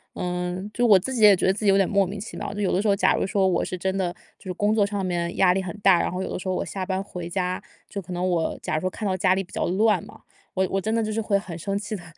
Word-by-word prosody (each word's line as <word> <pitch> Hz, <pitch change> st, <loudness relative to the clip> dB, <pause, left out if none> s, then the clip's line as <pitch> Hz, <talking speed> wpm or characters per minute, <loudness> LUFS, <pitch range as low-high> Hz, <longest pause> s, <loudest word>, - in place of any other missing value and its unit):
嗯， 180 Hz, +2 st, -3 dB
就 245 Hz, -, +1 dB
我 205 Hz, -, +8 dB
自 260 Hz, +8 st, -4 dB
己 225 Hz, -3 st, 0 dB
也 205 Hz, -, +9 dB
觉 -, -, -1 dB
得 190 Hz, -, +4 dB
自 210 Hz, -, -7 dB
己 -, -, +5 dB
有 195 Hz, -, +5 dB
点 195 Hz, -, +3 dB
莫 200 Hz, -1 st, +3 dB
名 195 Hz, +3 st, -6 dB
其 215 Hz, -, -8 dB
妙。 200 Hz, -, -4 dB
就 205 Hz, -, -6 dB
有 195 Hz, -, +1 dB
的 190 Hz, -, +2 dB
时 215 Hz, -, -1 dB
候 -, -, +5 dB
假 -, -, +3 dB
如 -, -, 0 dB
说 195 Hz, 0 st, +2 dB
我 185 Hz, -, +1 dB
是 185 Hz, -, -4 dB
真 190 Hz, +2 st, -1 dB
的 180 Hz, -2 st, -1 dB, 0.2 s
就 -, -, -20 dB
是 -, -, -2 dB
工 205 Hz, +4 st, +1 dB
作 205 Hz, -2 st, +4 dB
上 200 Hz, -1 st, -2 dB
面 170 Hz, -1 st, -2 dB
压 180 Hz, -2 st, +5 dB
力 190 Hz, 0 st, -1 dB
很 180 Hz, -, -6 dB
大， 195 Hz, -3 st, +5 dB
然 -, -, -1 dB
后 180 Hz, +1 st, -3 dB
有 -, -, -4 dB
的 -, -, -2 dB
时 190 Hz, -, -7 dB
候 185 Hz, -, 0 dB
我 -, -, -2 dB
下 190 Hz, -2 st, -4 dB
班 190 Hz, 0 st, -1 dB
回 175 Hz, -3 st, -7 dB
家， 180 Hz, 0 st, -2 dB, 0.3 s
就 200 Hz, -, -5 dB
可 180 Hz, -, -11 dB
能 180 Hz, +1 st, -1 dB
我 170 Hz, -3 st, -1 dB
假 -, -, -2 dB
如 155 Hz, -, 0 dB
说 185 Hz, -, 0 dB
看 215 Hz, -, -6 dB
到 185 Hz, -, 0 dB
家 185 Hz, 0 st, +3 dB
里 195 Hz, -, 0 dB
比 180 Hz, -, -19 dB
较 -, -, -1 dB
乱 205 Hz, +1 st, +2 dB
嘛， -, -, -15 dB, 0.3 s
我 190 Hz, 0 st, +1 dB
我 195 Hz, -, +1 dB
真 220 Hz, +3 st, -1 dB
的 225 Hz, -, +1 dB
就 215 Hz, -, -2 dB
是 225 Hz, +1 st, -1 dB
会 200 Hz, -2 st, +1 dB
很 175 Hz, -4 st, -8 dB
生 195 Hz, +4 st, -2 dB
气 210 Hz, +1 st, -4 dB
的 175 Hz, -, -12 dB
190 Hz, 370 characters per minute, -24 LUFS, 180-205 Hz, 0.3 s, 也